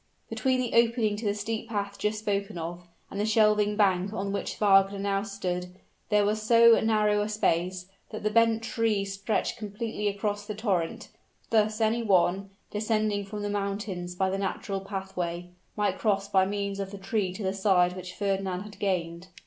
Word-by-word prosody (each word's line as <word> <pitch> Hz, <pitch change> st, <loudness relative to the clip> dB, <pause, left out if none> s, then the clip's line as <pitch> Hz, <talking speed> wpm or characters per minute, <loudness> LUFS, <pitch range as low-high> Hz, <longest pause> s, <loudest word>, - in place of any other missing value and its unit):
Between 260 Hz, -1 st, +1 dB
the 245 Hz, -2 st, -2 dB
opening 230 Hz, -2 st, +3 dB
to 220 Hz, -, -6 dB
the 205 Hz, 0 st, +1 dB
steep 220 Hz, +2 st, -4 dB
path 200 Hz, -2 st, -3 dB
just 210 Hz, +1 st, 0 dB
spoken 200 Hz, -2 st, -2 dB
of, 170 Hz, +1 st, -6 dB, 0.2 s
and 200 Hz, -, -5 dB
the 210 Hz, -, +1 dB
shelving 210 Hz, -1 st, +3 dB
bank 195 Hz, -2 st, +2 dB
on 200 Hz, -2 st, -3 dB
which 200 Hz, -, -3 dB
Wagner 195 Hz, -1 st, +4 dB
now 195 Hz, 0 st, 0 dB
stood, 180 Hz, -3 st, -4 dB, 0.3 s
there 210 Hz, -1 st, +4 dB
was 215 Hz, +1 st, 0 dB
so 230 Hz, +1 st, +6 dB
narrow 210 Hz, -2 st, +2 dB
a 210 Hz, -, -2 dB
space, 180 Hz, -3 st, 0 dB, 0.2 s
that 215 Hz, -, -7 dB
the 215 Hz, -, +1 dB
bent 225 Hz, 0 st, +3 dB
tree 225 Hz, -3 st, 0 dB
stretched 195 Hz, +4 st, -2 dB
completely 210 Hz, 0 st, -3 dB
across 205 Hz, 0 st, -2 dB
the 210 Hz, -, -4 dB
torrent; 195 Hz, -6 st, -1 dB, 0.4 s
thus 215 Hz, -1 st, +2 dB
any 225 Hz, +1 st, +2 dB
one, 195 Hz, -2 st, +2 dB, 0.2 s
descending 215 Hz, -1 st, 0 dB
from 205 Hz, +1 st, -6 dB
the 205 Hz, -, -2 dB
mountains 195 Hz, -3 st, -3 dB
by 190 Hz, +1 st, +1 dB
the 195 Hz, -, -2 dB
natural 195 Hz, 0 st, -2 dB
pathway, 190 Hz, -3 st, -4 dB, 0.3 s
might 210 Hz, -1 st, 0 dB
cross 200 Hz, -2 st, +1 dB
by 190 Hz, -2 st, +3 dB
means 200 Hz, 0 st, -3 dB
of 195 Hz, -1 st, -3 dB
the 200 Hz, -, -8 dB
tree 195 Hz, 0 st, -1 dB
to 200 Hz, -, -6 dB
the 190 Hz, 0 st, 0 dB
side 185 Hz, -3 st, +3 dB
which 180 Hz, -1 st, -8 dB
Fernand 195 Hz, -2 st, -1 dB
had 210 Hz, -1 st, -12 dB
gained. 175 Hz, -3 st, -2 dB
200 Hz, 180 wpm, -28 LUFS, 190-215 Hz, 0.4 s, so